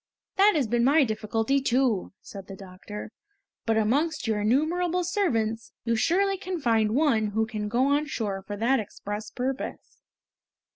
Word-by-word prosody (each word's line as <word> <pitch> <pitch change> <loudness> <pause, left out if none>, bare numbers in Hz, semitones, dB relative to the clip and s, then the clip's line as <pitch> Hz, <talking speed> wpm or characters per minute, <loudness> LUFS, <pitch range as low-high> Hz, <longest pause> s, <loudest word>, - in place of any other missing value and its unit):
"That 405 +2 +6
has 290 -4 +2
been 235 +2 +1
my 285 +4 +5
difficulty 225 +3 0
too," 250 -6 +1
said 195 -1 -10
the 195 - -8
doctor. 195 +3 -9 0.6
"But 225 -1 +2
amongst 285 +9 +1
your 220 -2 0
innumerable 335 +10 +1
servants, 230 - -1
you 230 -1 +1
surely 385 - +2
can 370 -2 -4
find 225 -4 +2
one 260 -8 +3
who 220 +2 0
can 215 -2 -4
go 245 +4 +2
on 290 +2 +1
shore 205 -7 -3
for 205 0 -5
that 245 +5 +2
express 210 0 -6
purpose!" 260 +3 -5
235 Hz, 155 wpm, -26 LUFS, 215-295 Hz, 0.6 s, That